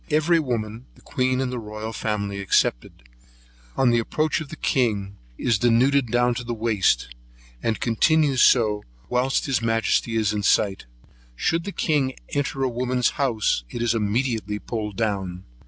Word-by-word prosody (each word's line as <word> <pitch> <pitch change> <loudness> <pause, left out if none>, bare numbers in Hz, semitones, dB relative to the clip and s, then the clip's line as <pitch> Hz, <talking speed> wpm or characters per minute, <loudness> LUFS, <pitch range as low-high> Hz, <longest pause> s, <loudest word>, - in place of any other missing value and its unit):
Every 160 +2 +3
woman, 115 -4 -3
the - - -20
queen 130 0 0
and 130 -1 -2
royal 110 -1 -6
family 100 -2 -3
excepted, - - 0 0.7
on 130 -2 +4
the 120 - +3
approach 155 +7 -1
of 150 - -8
the - - -7
king, 105 -9 0 0.2
is 115 -4 +1
denuded 125 +3 +3
down 120 +1 +2
to 125 +1 -5
the 120 0 -4
waist, 105 - +1 0.5
and 110 -2 -1
continues 140 +3 +2
so 105 -4 +4 0.3
whilst 125 +2 +1
his 135 -4 0
majesty 115 0 +1
is 110 -2 +1
in 105 - -1
sight. 95 - +1 0.5
Should 165 - 0
the 200 - -4
king 145 -8 0
enter 140 -1 -2
a - - +2
woman's 125 0 0
house, 110 - +1
it 120 - -4
is 120 -1 +2
immediately 110 -1 -1
pulled 105 -2 -5
down. 95 -5 -2
115 Hz, 155 wpm, -23 LUFS, 105-130 Hz, 0.7 s, on